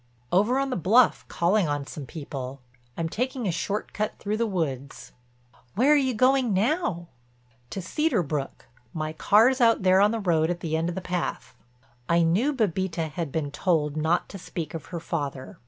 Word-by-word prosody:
"Over 210 Hz, +8 st, +3 dB
on 275 Hz, 0 st, 0 dB
the -, -, 0 dB
bluff, 220 Hz, +7 st, +3 dB
calling 180 Hz, +2 st, +1 dB
on 145 Hz, -1 st, -2 dB
some 145 Hz, -2 st, -8 dB
people. 135 Hz, -3 st, -7 dB, 0.3 s
I'm 165 Hz, -, -1 dB
taking 250 Hz, +5 st, -2 dB
a -, -, +1 dB
short 200 Hz, +5 st, -3 dB
cut 215 Hz, 0 st, -2 dB
through 210 Hz, +1 st, -2 dB
the 230 Hz, 0 st, +1 dB
woods." 140 Hz, -, -4 dB, 0.6 s
"Where 265 Hz, +8 st, +5 dB
are -, -, +6 dB
you 260 Hz, -4 st, +1 dB
going 255 Hz, -2 st, +3 dB
now?" 195 Hz, -, 0 dB, 0.6 s
"To 190 Hz, -, -5 dB
Cedar 260 Hz, -, +1 dB
Brook. 145 Hz, -2 st, -4 dB, 0.3 s
My 155 Hz, -1 st, -3 dB
car's 235 Hz, -, +4 dB
out 230 Hz, -4 st, +4 dB
there 185 Hz, +1 st, +5 dB
on 205 Hz, -, +5 dB
the 230 Hz, +1 st, -2 dB
road 165 Hz, -5 st, +2 dB
at 175 Hz, 0 st, -3 dB
the 160 Hz, -1 st, -2 dB
end 165 Hz, +2 st, 0 dB
of 175 Hz, -, -4 dB
the 190 Hz, -, -3 dB
path." 180 Hz, -1 st, -4 dB, 0.5 s
I 170 Hz, 0 st, +4 dB
knew 195 Hz, -, +2 dB
Bébita 185 Hz, -, -1 dB
had 165 Hz, -3 st, -4 dB
been 145 Hz, -2 st, -2 dB
told 150 Hz, -2 st, 0 dB
not 160 Hz, +3 st, +1 dB
to 195 Hz, -, -8 dB
speak 170 Hz, -2 st, -6 dB
of 160 Hz, -3 st, -7 dB
her 175 Hz, -, -5 dB
father. 145 Hz, -5 st, -5 dB
180 Hz, 190 wpm, -26 LUFS, 160-220 Hz, 0.6 s, are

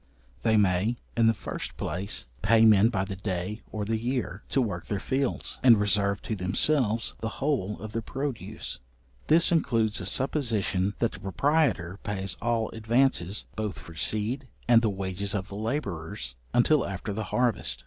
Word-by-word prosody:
They 110 Hz, -1 st, +3 dB
may, 100 Hz, +4 st, +2 dB, 0.2 s
in 115 Hz, -1 st, +4 dB
the 115 Hz, -, +5 dB
first -, -, -6 dB
place, 95 Hz, +3 st, -3 dB, 0.2 s
pay 115 Hz, 0 st, +5 dB
men 110 Hz, 0 st, +6 dB
by 95 Hz, -5 st, -1 dB
the 95 Hz, 0 st, -5 dB
day 95 Hz, +2 st, -3 dB
or 105 Hz, -1 st, -3 dB
the 110 Hz, +1 st, -1 dB
year, 120 Hz, -5 st, -2 dB
to -, -, +2 dB
work 100 Hz, -9 st, -2 dB
their 100 Hz, -, -1 dB
fields, 130 Hz, +4 st, -1 dB
and 120 Hz, -4 st, +7 dB
reserve 100 Hz, -1 st, +1 dB
to 110 Hz, -, -2 dB
themselves 110 Hz, +5 st, +2 dB
the 110 Hz, -, -2 dB
whole 130 Hz, -8 st, -1 dB
of 110 Hz, 0 st, -7 dB
the 115 Hz, -, -2 dB
produce; 115 Hz, -5 st, -5 dB, 0.5 s
this 165 Hz, +3 st, +4 dB
includes 115 Hz, -10 st, +1 dB
a 95 Hz, -, -1 dB
supposition 105 Hz, -6 st, 0 dB
that 115 Hz, -, +1 dB
the -, -, -10 dB
proprietor 100 Hz, -, +1 dB
pays 95 Hz, -2 st, -3 dB
all 115 Hz, -1 st, 0 dB
advances, 110 Hz, -4 st, +1 dB
both 110 Hz, -3 st, -3 dB
for 80 Hz, -, -11 dB
seed, 110 Hz, -, -1 dB, 0.2 s
and 120 Hz, -1 st, +6 dB
the 115 Hz, -, +2 dB
wages 100 Hz, +1 st, -2 dB
of 95 Hz, 0 st, -3 dB
the 100 Hz, -, -7 dB
labourers, 100 Hz, -, -3 dB, 0.2 s
until 140 Hz, +4 st, +4 dB
after 100 Hz, +2 st, -4 dB
the 110 Hz, +1 st, -3 dB
harvest. 120 Hz, -, +1 dB
110 Hz, 170 wpm, -27 LUFS, 95-120 Hz, 0.5 s, and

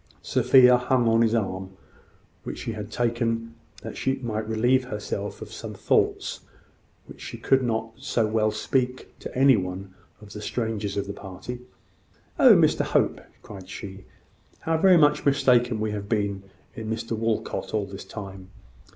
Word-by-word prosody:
Sophia 125 Hz, 0 st, +5 dB
hung 125 Hz, -1 st, +1 dB
on 115 Hz, 0 st, +4 dB
his 115 Hz, 0 st, +3 dB
arm, 95 Hz, -3 st, -3 dB, 0.6 s
which -, -, -6 dB
she -, -, -4 dB
had 105 Hz, -2 st, -6 dB
taken 115 Hz, -1 st, -1 dB, 0.3 s
that -, -, -7 dB
she 135 Hz, -, 0 dB
might 110 Hz, -2 st, -3 dB
relieve 125 Hz, +4 st, +2 dB
herself 105 Hz, -4 st, -5 dB
of -, -, -12 dB
some -, -, -7 dB
thoughts -, -, 0 dB, 0.7 s
which -, -, -13 dB
she -, -, -7 dB
could 135 Hz, 0 st, +2 dB
not 115 Hz, -2 st, -2 dB
so 115 Hz, -, 0 dB
well 110 Hz, 0 st, +1 dB
speak 125 Hz, +3 st, -2 dB
to -, -, -8 dB
any 135 Hz, 0 st, +6 dB
one 95 Hz, 0 st, -4 dB, 0.3 s
of 105 Hz, -1 st, -13 dB
the 105 Hz, -, -7 dB
strangers 105 Hz, -3 st, -3 dB
of 100 Hz, -, -1 dB
the 100 Hz, -, -5 dB
party. 100 Hz, +6 st, -8 dB, 0.8 s
"Oh, -, -, +8 dB
Mr -, -, +3 dB
Hope!" -, -, +1 dB, 0.2 s
cried 95 Hz, -2 st, -11 dB
she, 95 Hz, 0 st, -8 dB, 0.6 s
"how 165 Hz, -, 0 dB
very 185 Hz, 0 st, +6 dB
much 150 Hz, -2 st, +4 dB
mistaken 125 Hz, -4 st, +3 dB
we 110 Hz, 0 st, -1 dB
have 100 Hz, -1 st, -5 dB
been 100 Hz, -3 st, -1 dB, 0.3 s
in 110 Hz, -1 st, -6 dB
Mr 115 Hz, +1 st, -3 dB
Walcot 115 Hz, 0 st, -2 dB
all 105 Hz, -2 st, 0 dB
this 100 Hz, 0 st, -9 dB
time! 95 Hz, -3 st, -9 dB
110 Hz, 160 wpm, -25 LUFS, 100-125 Hz, 0.8 s, Oh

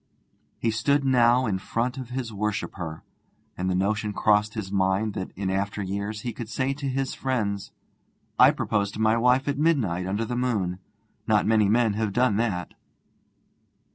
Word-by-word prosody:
He 115 Hz, -, 0 dB
stood 140 Hz, +6 st, +1 dB
now 125 Hz, -1 st, +4 dB
in 95 Hz, -4 st, -1 dB
front 120 Hz, +6 st, -2 dB
of 130 Hz, -2 st, -7 dB
his 125 Hz, -3 st, -4 dB
worshipper, 100 Hz, -6 st, -4 dB, 0.5 s
and 95 Hz, +1 st, -2 dB
the 90 Hz, -, +1 dB
notion 105 Hz, +3 st, 0 dB
crossed 105 Hz, +1 st, +2 dB
his 100 Hz, -3 st, -5 dB
mind 100 Hz, +2 st, +1 dB
that 95 Hz, -, -4 dB
in 95 Hz, 0 st, -2 dB
after 100 Hz, +1 st, -2 dB
years 100 Hz, +2 st, -4 dB
he 120 Hz, -2 st, -4 dB
could 110 Hz, 0 st, -7 dB
say 130 Hz, +4 st, -1 dB
to 140 Hz, 0 st, -5 dB
his 135 Hz, 0 st, -2 dB
friends: 105 Hz, -7 st, -2 dB, 0.7 s
'I -, -, +9 dB
proposed 100 Hz, -2 st, -1 dB
to -, -, -6 dB
my 110 Hz, 0 st, +3 dB
wife 125 Hz, +3 st, +3 dB
at 140 Hz, 0 st, -1 dB
midnight 110 Hz, -, +1 dB
under 105 Hz, +4 st, -1 dB
the 120 Hz, -, -3 dB
moon. 105 Hz, -8 st, -1 dB, 0.5 s
Not -, -, +3 dB
many 110 Hz, -2 st, +3 dB
men 115 Hz, -1 st, +3 dB
have 105 Hz, -1 st, -1 dB
done 120 Hz, -3 st, +2 dB
that.' 100 Hz, -6 st, -1 dB
110 Hz, 170 wpm, -25 LUFS, 100-125 Hz, 0.7 s, I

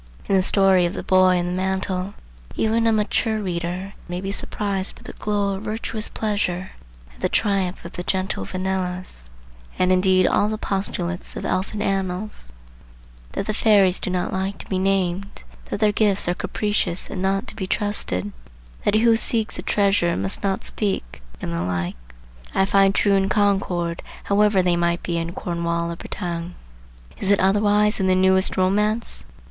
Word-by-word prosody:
In 195 Hz, -, +2 dB
the 190 Hz, -, +5 dB
story 190 Hz, -2 st, +4 dB
of 175 Hz, -, -5 dB
the -, -, -4 dB
Boy 185 Hz, -1 st, +4 dB
and 175 Hz, 0 st, -1 dB
the 180 Hz, -, -2 dB
Mantle 190 Hz, +1 st, -2 dB, 0.4 s
even 225 Hz, +1 st, +2 dB
a -, -, +4 dB
mature 220 Hz, +1 st, +1 dB
reader 180 Hz, 0 st, -3 dB
may 175 Hz, 0 st, -4 dB
be 195 Hz, +1 st, -4 dB
surprised 200 Hz, -1 st, -2 dB
with -, -, -14 dB
a -, -, -7 dB
glow 205 Hz, -1 st, -1 dB
of 190 Hz, -, -5 dB
virtuous 220 Hz, 0 st, -3 dB
pleasure 190 Hz, -4 st, -2 dB, 0.4 s
at -, -, -21 dB
the -, -, +1 dB
triumph 195 Hz, -5 st, 0 dB
of 170 Hz, -, -7 dB
the 180 Hz, -, -5 dB
gentle 185 Hz, -, -1 dB
Venelas; 185 Hz, -, -3 dB, 0.5 s
and 185 Hz, 0 st, +3 dB
indeed 185 Hz, 0 st, +4 dB
all 205 Hz, -, +2 dB
the 215 Hz, -, -2 dB
postulates 185 Hz, -4 st, -2 dB
of -, -, -5 dB
elfin 205 Hz, +3 st, -1 dB
annals,—that -, -, -6 dB
the 215 Hz, -, -1 dB
fairies 200 Hz, -4 st, +4 dB
do -, -, -3 dB
not 180 Hz, -1 st, -1 dB
like 190 Hz, +1 st, -2 dB
to -, -, -9 dB
be 190 Hz, -, 0 dB
named; 195 Hz, 0 st, -1 dB, 0.2 s
that -, -, -4 dB
their 210 Hz, -1 st, +4 dB
gifts 205 Hz, -3 st, +3 dB
are 175 Hz, -, +2 dB
capricious 195 Hz, -1 st, -1 dB
and 185 Hz, -, -5 dB
not 195 Hz, +1 st, 0 dB
to -, -, -9 dB
be 190 Hz, -4 st, -4 dB
trusted; 185 Hz, -, -1 dB, 0.5 s
that 205 Hz, -, +2 dB
who 225 Hz, +1 st, +5 dB
seeks 225 Hz, -1 st, 0 dB
a -, -, -2 dB
treasure 195 Hz, -4 st, +2 dB
must 95 Hz, 0 st, -1 dB
not 195 Hz, -1 st, -1 dB
speak; 125 Hz, -, -3 dB, 0.2 s
and 85 Hz, -, -3 dB
the 85 Hz, -, -1 dB
like,—I -, -, -4 dB
find 195 Hz, 0 st, +4 dB
true 205 Hz, -, +3 dB
in 195 Hz, 0 st, +2 dB
Concord, 190 Hz, -5 st, +1 dB, 0.2 s
however 205 Hz, -1 st, +3 dB
they 175 Hz, -1 st, +2 dB
might 170 Hz, 0 st, 0 dB
be 170 Hz, -1 st, -1 dB
in 165 Hz, +1 st, -4 dB
Cornwall 170 Hz, -1 st, -2 dB
or -, -, -4 dB
Bretagne. 170 Hz, 0 st, -5 dB, 0.7 s
Is 195 Hz, -, +1 dB
it 200 Hz, -, +4 dB
otherwise 205 Hz, +2 st, +3 dB
in 190 Hz, -, +1 dB
the 185 Hz, -, +4 dB
newest 190 Hz, +1 st, +3 dB
romance? 210 Hz, +4 st, 0 dB
190 Hz, 175 wpm, -22 LUFS, 175-205 Hz, 0.7 s, the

